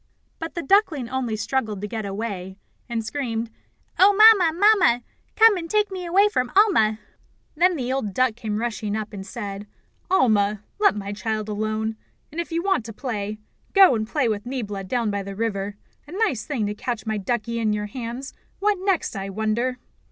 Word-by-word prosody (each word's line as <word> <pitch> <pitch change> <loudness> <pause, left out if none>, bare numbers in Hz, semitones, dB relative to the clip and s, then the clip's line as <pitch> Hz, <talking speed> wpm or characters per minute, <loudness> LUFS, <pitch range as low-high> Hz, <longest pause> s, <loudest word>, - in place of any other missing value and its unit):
But 325 0 -6
the 340 - -3
duckling 315 - +2
only 250 -4 -2
struggled 215 -1 -2
to 210 - -3
get 220 -1 -4
away, 195 -2 -5 0.3
and 230 -2 -2
screamed: 230 -3 -3 0.5
"Oh, 395 +2 +7
Mamma! 425 -5 +7
Mamma! 365 - +4 0.3
Come 450 -2 +6
and 330 -2 -5
take 420 0 +1
me 365 -2 -5
away 390 +4 +5
from 255 -12 -1
Alma!" 350 - +4 0.6
Then 355 +3 +3
the 255 -3 -2
old 265 -7 -2
duck 255 +3 +1
came 215 -3 -3
rushing 215 -2 -2
up, 215 0 -5
and 195 -2 -6
said: 205 -1 -6 0.4
"Alma, 215 - +2 0.2
let 410 - +4
my 200 -1 -4
child 215 +1 -3
alone; 215 +1 -2 0.3
and 330 +3 -2
if 340 - -9
you 335 +1 -1
want 385 - +1
to 225 - -7
play, 215 -4 -4 0.4
go 385 -7 +7
and 220 -2 -1
play 275 -3 +1
with 210 -2 -1
Niebla 210 -7 -4
down 230 +1 -1
by 200 0 -2
the 195 0 -7
river. 205 -2 -2 0.3
A 305 - -10
nice 385 - 0
thing 255 -8 -2
to 205 - -2
catch 235 +2 -4
my 220 -1 -1
duckie 235 +3 -2
in 220 -2 +1
your 210 0 -1
hands 240 +4 -6 0.2
what 410 -1 +1
next, 385 - 0
I 195 0 -4
wonder!" 220 +5 -1
230 Hz, 190 wpm, -23 LUFS, 210-325 Hz, 0.6 s, Oh